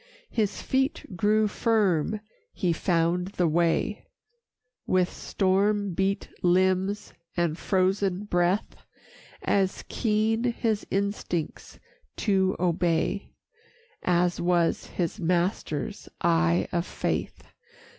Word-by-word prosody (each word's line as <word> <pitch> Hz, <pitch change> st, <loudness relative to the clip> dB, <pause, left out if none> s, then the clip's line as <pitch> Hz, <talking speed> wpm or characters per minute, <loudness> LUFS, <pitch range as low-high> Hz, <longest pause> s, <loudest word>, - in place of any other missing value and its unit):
His 210 Hz, -3 st, -1 dB
feet 265 Hz, +2 st, 0 dB
grew 210 Hz, +4 st, +3 dB
firm, 210 Hz, -3 st, +1 dB, 0.3 s
he 175 Hz, -4 st, 0 dB
found 170 Hz, +1 st, +1 dB
the 175 Hz, -, +3 dB
way 165 Hz, +1 st, +1 dB, 0.8 s
With 185 Hz, -1 st, +2 dB
storm 200 Hz, +1 st, +1 dB
beat 195 Hz, +2 st, 0 dB
limbs 185 Hz, +3 st, +2 dB, 0.2 s
and 170 Hz, -3 st, +1 dB
frozen 190 Hz, +1 st, +1 dB
breath, 180 Hz, 0 st, 0 dB, 0.7 s
As 195 Hz, -2 st, +1 dB
keen 225 Hz, +1 st, +1 dB
his 230 Hz, -3 st, 0 dB
instincts 195 Hz, -5 st, -3 dB, 0.4 s
to 190 Hz, -2 st, +2 dB
obey 175 Hz, +2 st, 0 dB, 0.7 s
As 175 Hz, 0 st, +1 dB
was 175 Hz, -1 st, +1 dB
his 170 Hz, -3 st, -3 dB
master's 170 Hz, -4 st, -1 dB
eye 85 Hz, +3 st, +2 dB
of 170 Hz, +1 st, -1 dB
faith. -, -, -3 dB
185 Hz, 95 wpm, -27 LUFS, 175-205 Hz, 0.8 s, grew